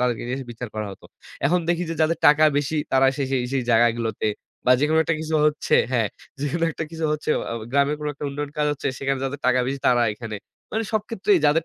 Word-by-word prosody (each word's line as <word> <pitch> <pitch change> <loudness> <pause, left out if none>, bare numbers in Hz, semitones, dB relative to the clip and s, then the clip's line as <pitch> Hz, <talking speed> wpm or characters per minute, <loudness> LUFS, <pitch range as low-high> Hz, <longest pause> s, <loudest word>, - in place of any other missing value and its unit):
তাদেরকে 125 -2 0
নিয়ে 125 - -2
এসে 135 - -7
বিচার 120 0 -6
করা 110 -1 -3
হতো। - - -15 0.4
এখন 175 +3 +2
দেখি 175 0 +1
যে, - - -2
যাদের 160 +2 +1
টাকা 150 +1 +6
বেশি, 145 +2 -2 0.2
তারা 135 0 +5
এসে 140 - -3
সেই, 130 -2 +1
সেই 135 -2 +1
জায়গাগুলোতে, 115 -1 +2 0.4
বা 125 - +5
যেকোনো 155 +2 +3
একটা 165 - +1
কিছু 160 0 -3
হচ্ছে 150 0 +1 0.2
হ্যাঁ, 115 -4 +2 0.3
যেকোনো 160 +4 0
একটা 160 - -4
কিছু 165 -1 -4
হচ্ছে, 150 0 -2
অ - - -5
অ - - -3 0.2
গ্রামের 140 +2 +2
কোনো 150 - -3
একটা 145 - -7
উন্নয়ন 145 +1 -4
কাজ 150 - +1
হচ্ছে, 145 - -3
সেখানে 135 -1 -1
যাদের 140 +2 -4
টাকা 130 0 +4
বেশি, 135 +1 -2
তারা 120 -1 +4
এখানে। 110 0 -6 0.4
মানে 220 +1 0
সব 215 - +1
ক্ষেত্রেই 205 -3 +2
যাদের 155 +2 +3
140 Hz, 230 wpm, -23 LUFS, 125-155 Hz, 0.4 s, টাকা